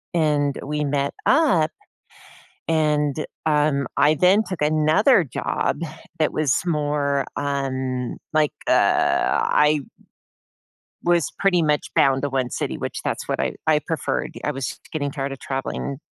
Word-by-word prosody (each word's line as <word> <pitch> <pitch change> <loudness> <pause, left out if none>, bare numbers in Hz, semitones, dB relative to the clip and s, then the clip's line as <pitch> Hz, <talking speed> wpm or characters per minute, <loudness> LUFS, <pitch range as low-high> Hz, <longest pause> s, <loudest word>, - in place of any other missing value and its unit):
And 150 -3 +1
we 150 +1 -2
met 140 0 -1
up, 265 - +3 1.0
and, 150 -2 +1 0.2
um, 150 -3 +2
I 150 +1 +5
then 185 +7 +4
took 185 -7 -5
another 155 - +4
job 135 +3 -2 0.4
that 155 - +1
was 150 -3 +1
more, 145 -4 0
um, 130 -3 -2 0.2
like, 155 -1 +2
uh, - - +3
I 150 0 +3
w - - -22 1.2
was 170 -4 +2
pretty 180 -3 +3
much 150 -2 +1
bound 135 0 +3
to 145 - 0
1 130 -2 -1
city, - - -3
which - - -5
that's - - -3
what - - -2
I - - 0
I 155 -1 +4
preferred. 165 -3 -2
I 150 - 0
was 135 -3 -4
just - - -9
getting 145 -3 -2
tired 140 -1 -3
of 135 - -7
traveling 135 0 -4
150 Hz, 145 wpm, -22 LUFS, 140-155 Hz, 1.2 s, I